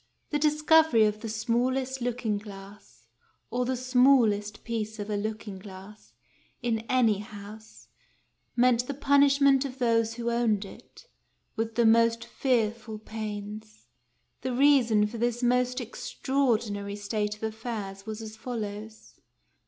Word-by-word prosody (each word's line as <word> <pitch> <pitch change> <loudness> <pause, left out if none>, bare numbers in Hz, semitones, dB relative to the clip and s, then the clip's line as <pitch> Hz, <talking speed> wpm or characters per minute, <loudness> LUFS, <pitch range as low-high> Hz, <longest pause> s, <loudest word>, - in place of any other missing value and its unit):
The 295 - +1
discovery 305 -5 +4
of 210 0 -1
the 225 - -5
small 235 +4 0
est 265 0 -4
looking 235 -4 -1
glass 200 0 -13 0.5
or 250 0 0
the 260 +1 -1
smallest 250 -5 +3
piece 220 -2 -4
of 205 0 -5
a - - 0
looking 210 -1 -4
glass 195 +2 -13 0.5
in 235 -2 -1
any 230 -6 +3
house 210 +1 -11 0.7
meant 245 0 +3
the 280 - -4
punishment 280 -1 +4
of 265 -2 -6
those 230 -2 +1
who 235 0 -2
owned 225 -4 +1
it, 195 - -14 0.5
with 225 0 -3
the 235 - +3
most 230 +1 +4
fearful 230 -3 -1
pains. 210 - -7 0.6
The 255 - -2
reason 245 -6 +4
for 220 +2 -6
this 240 +1 -1
most 250 +1 +2
extraordinary 230 -4 -1
state 210 0 -2
of 210 - -16
affairs 215 -3 -5
was 220 +1 -5
as 215 0 -8
follows. 220 -2 -7
225 Hz, 135 wpm, -28 LUFS, 210-250 Hz, 0.7 s, discovery